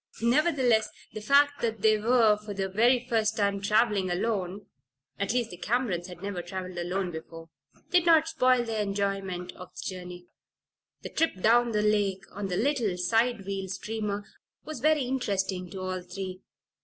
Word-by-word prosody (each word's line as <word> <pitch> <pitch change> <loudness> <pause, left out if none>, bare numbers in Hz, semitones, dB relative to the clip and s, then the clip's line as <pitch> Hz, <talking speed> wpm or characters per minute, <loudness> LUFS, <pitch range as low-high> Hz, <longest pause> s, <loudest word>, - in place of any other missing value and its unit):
Nevertheless, 250 -4 +3 0.2
the 215 - -6
fact 285 +5 +4
that 225 -3 -2
they 215 -1 +6
were 225 -1 +4
for 210 -1 -8
the 195 0 -1
very 240 +6 +3
first 220 -1 +1
time 200 -1 +1
traveling 210 -2 +2
alone 190 +1 -2 0.5
(at 200 +1 0
least, 240 -1 0
the 180 - -9
Camerons 195 -4 -1
had 180 0 -11
never 200 -3 -3
traveled 185 0 -6
alone 180 +1 -2
before) 165 0 -9 0.4
did 355 -1 +4
not 325 -1 +6
spoil 255 -6 +3
their 225 -2 -2
enjoyment 195 -3 -2
of 180 - -11
the - - -7
journey. 180 -1 -7 0.8
The - - -5
trip 325 -12 0
down 235 +4 +4
the 210 -1 +1
lake 205 -3 +1
on 200 0 -4
the 180 -1 -2
little 235 -7 +1
side 225 +3 +1
wheel 195 -1 -3
steamer 210 0 -3 0.4
was 310 -4 -6
very 305 +1 +3
interesting 195 -8 -2
to 190 +2 -7
all 185 0 -3
three. 185 +1 -7
205 Hz, 170 wpm, -28 LUFS, 185-235 Hz, 0.8 s, they